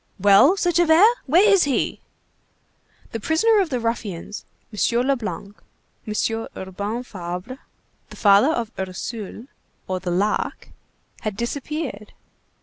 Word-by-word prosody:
"Well," 205 Hz, -, +6 dB
said 350 Hz, -2 st, +1 dB
Javert, 335 Hz, +2 st, +5 dB, 0.2 s
"where 350 Hz, +10 st, +5 dB
is 395 Hz, -5 st, +5 dB
he?" 275 Hz, -3 st, -1 dB, 1.1 s
The 225 Hz, -, -4 dB
prisoner 410 Hz, -, +3 dB
of 375 Hz, -4 st, +1 dB
the 255 Hz, -4 st, -1 dB
ruffians, 210 Hz, -5 st, -4 dB, 0.3 s
M. 235 Hz, +3 st, +1 dB
Leblanc, 220 Hz, -6 st, -3 dB, 0.5 s
M. 225 Hz, +1 st, -1 dB
Urbain 200 Hz, +5 st, -4 dB
Fabre, 185 Hz, +4 st, -7 dB, 0.5 s
the -, -, -11 dB
father 205 Hz, +6 st, +5 dB
of 235 Hz, -8 st, -2 dB
Ursule 200 Hz, +4 st, -6 dB, 0.4 s
or 185 Hz, 0 st, -2 dB
the 180 Hz, 0 st, -5 dB
Lark, 200 Hz, +4 st, -1 dB, 0.5 s
had 215 Hz, -3 st, -4 dB
disappeared. 260 Hz, -2 st, -4 dB
230 Hz, 120 wpm, -22 LUFS, 200-295 Hz, 1.1 s, Well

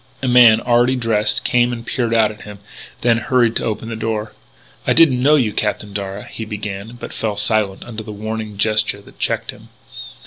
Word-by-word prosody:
A -, -, 0 dB
man, 120 Hz, -3 st, +7 dB
already 120 Hz, +1 st, +3 dB
dressed, 105 Hz, -3 st, 0 dB
came 120 Hz, 0 st, +2 dB
and 115 Hz, -1 st, -6 dB
peered 120 Hz, -1 st, -2 dB
out 110 Hz, -2 st, +3 dB
at 105 Hz, -, -13 dB
him, 105 Hz, -1 st, -10 dB, 0.4 s
then 120 Hz, -1 st, +3 dB
hurried 120 Hz, -2 st, +2 dB
to -, -, -3 dB
open 115 Hz, 0 st, -3 dB
the 115 Hz, -, -4 dB
door. 110 Hz, -1 st, -3 dB, 0.5 s
"I -, -, +4 dB
didn't 135 Hz, -7 st, +4 dB
know 145 Hz, +4 st, +5 dB
you, 120 Hz, -8 st, +1 dB
Captain 105 Hz, -1 st, -2 dB
Darragh 100 Hz, 0 st, -5 dB
" -, -, -14 dB
he 115 Hz, -, -3 dB
began, 105 Hz, +1 st, -6 dB
but -, -, -8 dB
fell 105 Hz, -2 st, -3 dB
silent 105 Hz, -2 st, 0 dB
under 115 Hz, -2 st, -7 dB
the 110 Hz, 0 st, -8 dB
warning 110 Hz, 0 st, -5 dB
gesture 105 Hz, -1 st, +1 dB
that -, -, -18 dB
checked -, -, -1 dB
him. -, -, -17 dB
110 Hz, 205 wpm, -19 LUFS, 105-120 Hz, 0.5 s, man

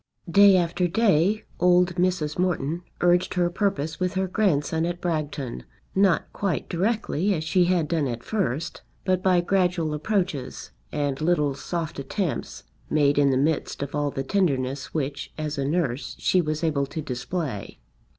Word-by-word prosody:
Day 200 Hz, +2 st, +7 dB
after 175 Hz, +1 st, +1 dB
day 205 Hz, +1 st, +2 dB, 0.2 s
old 180 Hz, 0 st, +4 dB
Mrs. 175 Hz, -4 st, 0 dB
Morton 175 Hz, -3 st, 0 dB, 0.2 s
urged 175 Hz, +1 st, +3 dB
her 175 Hz, -1 st, +2 dB
purpose 180 Hz, -5 st, -1 dB
with 185 Hz, +1 st, -1 dB
her 190 Hz, 0 st, 0 dB
grandson 165 Hz, -5 st, +1 dB
at 175 Hz, +1 st, -2 dB
Bragton, 150 Hz, -, -3 dB, 0.3 s
not 190 Hz, -3 st, +2 dB
quite 195 Hz, -3 st, -2 dB
directly 200 Hz, -1 st, 0 dB
as 155 Hz, -, -3 dB
she 175 Hz, +3 st, +3 dB
had 175 Hz, -3 st, +1 dB
done 155 Hz, -3 st, 0 dB
at 120 Hz, -1 st, -4 dB
first, 165 Hz, -, -2 dB, 0.2 s
but 185 Hz, -1 st, +1 dB
by 185 Hz, -2 st, +3 dB
gradual 180 Hz, -3 st, +1 dB
approaches 175 Hz, -3 st, -2 dB, 0.2 s
and 145 Hz, -1 st, -2 dB
little 155 Hz, -4 st, +2 dB
soft 165 Hz, +2 st, -4 dB
attempts 160 Hz, +5 st, -3 dB, 0.3 s
made 145 Hz, -1 st, +3 dB
in 140 Hz, -1 st, +4 dB
the 130 Hz, -, +2 dB
midst 145 Hz, 0 st, 0 dB
of 140 Hz, -, -6 dB
all 145 Hz, -1 st, 0 dB
the 135 Hz, -1 st, -3 dB
tenderness 135 Hz, -6 st, 0 dB
which, 140 Hz, -1 st, -3 dB
as 155 Hz, -2 st, -3 dB
a 135 Hz, -, 0 dB
nurse, 140 Hz, -4 st, -1 dB
she 185 Hz, -, +2 dB
was 155 Hz, 0 st, -3 dB
able 145 Hz, -4 st, +1 dB
to 160 Hz, -, -5 dB
display. 125 Hz, -, -4 dB
165 Hz, 160 wpm, -25 LUFS, 145-185 Hz, 0.3 s, Day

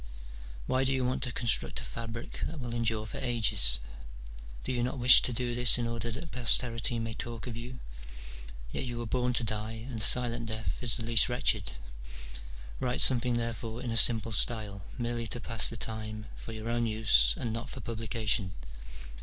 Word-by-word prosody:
" -, -, -14 dB
Why 130 Hz, +1 st, 0 dB
do 135 Hz, -, +1 dB
you 130 Hz, -1 st, 0 dB
want 125 Hz, +1 st, -1 dB
to 130 Hz, -1 st, +1 dB
construct 120 Hz, -1 st, 0 dB
a -, -, -8 dB
fabric 115 Hz, 0 st, -7 dB
that 160 Hz, -, -8 dB
will 120 Hz, -3 st, -5 dB
endure 115 Hz, -2 st, -1 dB
for -, -, -7 dB
ages? 110 Hz, -, +5 dB, 0.8 s
Do -, -, -3 dB
you 125 Hz, -1 st, -1 dB
not 125 Hz, +3 st, -2 dB
wish 125 Hz, 0 st, +8 dB
to -, -, 0 dB
do 120 Hz, 0 st, -2 dB
this 120 Hz, 0 st, +4 dB
in 120 Hz, -, -2 dB
order 115 Hz, 0 st, -4 dB
that 145 Hz, +8 st, -7 dB
posterity 120 Hz, -1 st, +1 dB
may 115 Hz, 0 st, -4 dB
talk 115 Hz, -1 st, -6 dB
of 125 Hz, -3 st, -6 dB
you: 125 Hz, +2 st, -8 dB, 0.9 s
yet -, -, -4 dB
you 120 Hz, -2 st, -5 dB
were 120 Hz, -, -4 dB
born 125 Hz, +2 st, -1 dB
to 120 Hz, -, 0 dB
die, 110 Hz, 0 st, -3 dB
and 120 Hz, -4 st, -6 dB
a -, -, +2 dB
silent 120 Hz, -2 st, +2 dB
death 110 Hz, -7 st, -4 dB
is 120 Hz, -1 st, +1 dB
the 115 Hz, -, -4 dB
least 115 Hz, 0 st, +3 dB
wretched. 120 Hz, -, 0 dB, 1.1 s
Write 125 Hz, -1 st, -1 dB
something 125 Hz, -1 st, +6 dB
therefore 115 Hz, -1 st, -4 dB
in 120 Hz, -, -3 dB
a -, -, -2 dB
simple 115 Hz, -1 st, +6 dB
style, 105 Hz, -2 st, 0 dB, 0.2 s
merely 120 Hz, -1 st, -3 dB
to 120 Hz, -, -4 dB
pass 115 Hz, -1 st, 0 dB
the 115 Hz, -, -7 dB
time, 110 Hz, -1 st, -5 dB
for -, -, -9 dB
your 110 Hz, 0 st, -7 dB
own 120 Hz, 0 st, 0 dB
use, 105 Hz, -, +4 dB
and 115 Hz, -2 st, -4 dB
not 115 Hz, +1 st, -6 dB
for -, -, -7 dB
publication. 110 Hz, -4 st, -2 dB
115 Hz, 195 wpm, -29 LUFS, 110-120 Hz, 1.1 s, wish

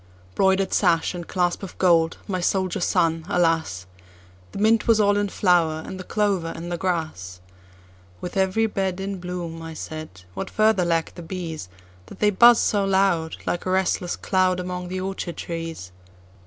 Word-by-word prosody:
Broider'd 190 Hz, -, +2 dB
sash 170 Hz, -3 st, +2 dB
and 175 Hz, -2 st, -7 dB
clasp 175 Hz, -2 st, 0 dB
of 195 Hz, -, -8 dB
gold, 165 Hz, -3 st, +3 dB
my 185 Hz, -2 st, -2 dB
soldier 185 Hz, 0 st, 0 dB
son, 165 Hz, -2 st, +1 dB
alas! 165 Hz, -, +1 dB, 0.7 s
The -, -, -8 dB
mint 220 Hz, +3 st, +3 dB
was 225 Hz, -2 st, +5 dB
all 205 Hz, -1 st, +4 dB
in 205 Hz, 0 st, 0 dB
flower, 170 Hz, -5 st, +2 dB
and 190 Hz, -, -7 dB
the -, -, -6 dB
clover 195 Hz, -4 st, 0 dB
in 170 Hz, +1 st, -6 dB
the 175 Hz, -, -2 dB
grass:"With 90 Hz, -, -6 dB
every 190 Hz, +3 st, +2 dB
bedIn 195 Hz, -2 st, -2 dB
bloom," 175 Hz, -2 st, -5 dB
I 165 Hz, 0 st, -7 dB
said,"What 155 Hz, -, -7 dB
further 215 Hz, -4 st, +3 dB
lack 165 Hz, -1 st, 0 dB
the 175 Hz, -, -9 dB
bees, 165 Hz, -, -6 dB, 0.4 s
That -, -, -12 dB
they 210 Hz, 0 st, +3 dB
buzz 235 Hz, +4 st, +7 dB
so 205 Hz, -2 st, +1 dB
loud, 190 Hz, -4 st, +1 dB
Like 175 Hz, -, -2 dB
a -, -, 0 dB
restless 185 Hz, -1 st, 0 dB
cloud, 185 Hz, -1 st, +1 dB
Among 180 Hz, 0 st, -4 dB
the 185 Hz, +1 st, -4 dB
orchard 185 Hz, -3 st, -4 dB
trees?" 165 Hz, -, -6 dB
180 Hz, 160 wpm, -23 LUFS, 165-190 Hz, 0.7 s, buzz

